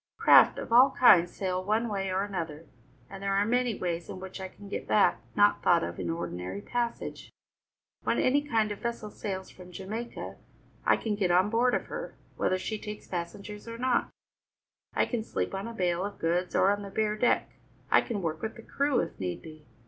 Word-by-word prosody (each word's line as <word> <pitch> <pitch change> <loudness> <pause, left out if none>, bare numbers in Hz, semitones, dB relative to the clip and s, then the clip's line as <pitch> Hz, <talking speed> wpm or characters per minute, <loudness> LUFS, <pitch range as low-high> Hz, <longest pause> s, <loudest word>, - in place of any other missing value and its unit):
Craft - - +7
of - - -4
all 255 +3 +8
kinds 175 -8 +7
sail 185 -1 -2
one 215 +4 +1
way 195 -3 -2
or 190 +1 +1
another, 165 -6 -5 0.4
and 195 0 -10
there 195 0 0
are 200 +1 +3
many 245 0 +1
ways 170 -1 -3
in - - -6
which 190 +1 -8
I 190 - -4
can 200 +2 -14
get - - -5
back 110 - +3
not - - +4
thought - - +4
of 85 0 -5
in - - -3
ordinary 95 - -4
passage. 235 - -3 0.7
When - - 0
any 275 +3 +3
kind 225 -7 0
of 205 - -5
a - - -23
vessel 235 -3 -4
sails 190 -3 -5
from 180 -1 -13
Jamaica, 210 +6 -6 0.5
I - - +5
can 220 - -2
get 200 -3 0
on 185 +4 +3
board 245 +2 +3
of - - -2
her, - - -6 0.2
whether 185 - +1
she 215 +3 -4
takes 210 0 -7
passengers 200 +5 -6
or 230 0 -6
not. 250 0 +1 0.9
I - - +3
can 235 -3 -2
sleep - - -3
on 195 +3 -3
a - - -5
bale 180 -3 0
of 205 +1 -5
goods 175 +2 0
or 195 - +5
on 205 0 -1
the 200 - -7
bare 210 +1 0
deck; 240 +3 +1 0.4
I - - +7
can 210 -6 -4
work 160 -1 -2
with 220 - -4
the 230 - -11
crew, 280 0 +1
if 165 - -6
need 90 -2 -4
be. 155 -2 -12
200 Hz, 210 wpm, -29 LUFS, 180-225 Hz, 0.9 s, all